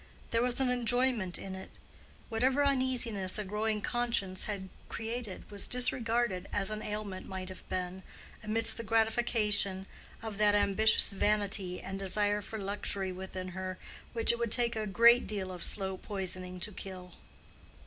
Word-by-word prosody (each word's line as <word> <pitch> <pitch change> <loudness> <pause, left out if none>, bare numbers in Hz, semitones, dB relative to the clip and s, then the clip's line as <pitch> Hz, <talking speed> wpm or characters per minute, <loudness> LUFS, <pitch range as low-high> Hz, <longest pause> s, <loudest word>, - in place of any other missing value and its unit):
There 230 - +2
was 245 +1 +1
an 265 -1 +2
enjoyment 245 -5 +1
in 190 - -6
it: 190 0 -8 0.6
whatever 260 +5 +2
uneasiness 250 -8 +1
a 210 - -2
growing 210 +2 -1
conscience 235 -6 -1
had 195 -3 -4 0.2
created 225 -3 -5
was 200 -1 0
disregarded 235 -5 +1
as 200 0 -1
an 215 0 -3
ailment 210 -3 -5
might 190 -1 -5
have 185 - -11
been, 185 0 -3 0.4
amidst 225 +1 +2
the 230 - -4
gratification 220 -3 +2 0.4
of 215 -2 -5
that 210 -1 +5
ambitious 210 +2 +4
vanity 200 -2 +1
and 195 0 -6
desire 205 +2 +1
for 220 +2 -7
luxury 200 -1 -2
within 185 0 -6
her 185 +1 -5 0.4
which 230 -1 +5
it 235 - -2
would 235 -2 -1
take 235 -1 +4
a 215 -1 -2
great 235 +4 +6
deal 195 -3 -2
of 180 -1 -6
slow 190 -2 0
poisoning 185 -2 -5
to 210 - -3
kill. 185 -2 -8
210 Hz, 155 wpm, -32 LUFS, 190-230 Hz, 0.6 s, great